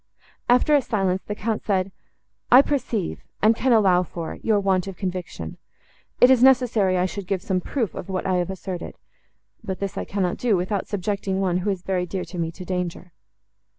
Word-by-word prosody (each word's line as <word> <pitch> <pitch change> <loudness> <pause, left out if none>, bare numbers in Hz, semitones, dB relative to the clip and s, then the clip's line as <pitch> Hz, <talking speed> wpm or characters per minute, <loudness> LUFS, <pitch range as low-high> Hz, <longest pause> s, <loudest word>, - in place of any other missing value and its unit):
After 250 +5 +4
a 290 - +5
silence, 190 -6 0
the 210 - -3
Count 220 +1 -2
said, 195 -2 0 0.6
"I 255 +3 +9
perceive, 245 - -2 0.2
and 220 +2 +4
can 260 +3 +1
allow 195 -6 +5
for, 170 -2 -6
your 215 -2 +2
want 190 -2 +1
of 195 - -7
conviction. 180 - -5 0.6
It 250 - +7
is 255 -2 +5
necessary 240 -8 +4
I 180 - +2
should 185 +1 -5
give 190 -1 -1
some 185 -2 0
proof 230 +1 -2
of 175 - -7
what 185 -1 -2
I 185 -1 +1
have 175 0 -1
asserted; 185 -2 -6 0.7
but 190 -4 -4
this 200 -1 -3
I - - -4
cannot 190 -3 -1
do, 230 -6 +2
without 190 +2 -2
subjecting 200 -1 -2
one, 185 -2 +1
who 185 +3 -1
is 190 -3 -2
very 180 -2 -1
dear 185 +1 -4
to 175 +1 -7
me, 165 -1 -1
to 180 +2 -10
danger." 180 -1 -4
190 Hz, 195 wpm, -23 LUFS, 180-215 Hz, 0.7 s, I